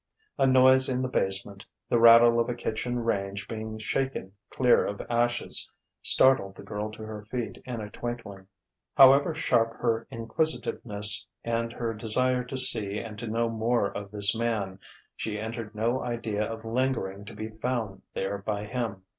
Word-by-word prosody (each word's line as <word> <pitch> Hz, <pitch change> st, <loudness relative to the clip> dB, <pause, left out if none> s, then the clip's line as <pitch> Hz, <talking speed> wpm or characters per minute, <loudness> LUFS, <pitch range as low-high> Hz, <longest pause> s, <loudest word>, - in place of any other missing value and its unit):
A 135 Hz, -, +4 dB
noise 130 Hz, 0 st, +5 dB
in 130 Hz, 0 st, -1 dB
the -, -, 0 dB
basement, 95 Hz, -3 st, -2 dB, 0.2 s
the 120 Hz, -, +2 dB
rattle 115 Hz, 0 st, +7 dB
of 115 Hz, -, +1 dB
a 120 Hz, -, -2 dB
kitchen 120 Hz, +1 st, -3 dB
range 100 Hz, -2 st, -2 dB
being 110 Hz, 0 st, -6 dB
shaken 130 Hz, -2 st, -2 dB, 0.2 s
clear 125 Hz, -2 st, +3 dB
of 100 Hz, -, -4 dB
ashes, 120 Hz, 0 st, 0 dB, 0.3 s
startled 130 Hz, -8 st, +3 dB
the -, -, -11 dB
girl 105 Hz, +1 st, -4 dB
to 110 Hz, -, -9 dB
her 110 Hz, -1 st, -7 dB
feet 120 Hz, -2 st, -4 dB
in 120 Hz, -3 st, -5 dB
a 105 Hz, -1 st, -7 dB
twinkling. 110 Hz, -6 st, -7 dB, 0.5 s
However 140 Hz, +4 st, +7 dB
sharp 115 Hz, -7 st, +1 dB
her 115 Hz, -1 st, -1 dB
inquisitiveness 115 Hz, -4 st, 0 dB, 0.2 s
and 115 Hz, 0 st, -1 dB
her 115 Hz, -2 st, -3 dB
desire 125 Hz, +4 st, 0 dB
to 130 Hz, +1 st, -5 dB
see 105 Hz, -5 st, +2 dB
and 105 Hz, -1 st, -7 dB
to 120 Hz, -, -5 dB
know 115 Hz, +2 st, 0 dB
more 115 Hz, -1 st, 0 dB
of 100 Hz, -1 st, -6 dB
this 100 Hz, 0 st, +3 dB
man, 110 Hz, -5 st, -2 dB, 0.4 s
she 105 Hz, -1 st, -4 dB
entertained 110 Hz, 0 st, -6 dB
no 115 Hz, +4 st, 0 dB
idea 110 Hz, -3 st, -2 dB
of 115 Hz, 0 st, -8 dB
lingering 115 Hz, -5 st, -1 dB
to 105 Hz, -, -10 dB
be 110 Hz, +1 st, -5 dB
found 110 Hz, -3 st, -3 dB
there 100 Hz, +1 st, -2 dB
by 105 Hz, +1 st, -3 dB
him.... 110 Hz, -5 st, -4 dB
115 Hz, 165 wpm, -27 LUFS, 105-120 Hz, 0.5 s, rattle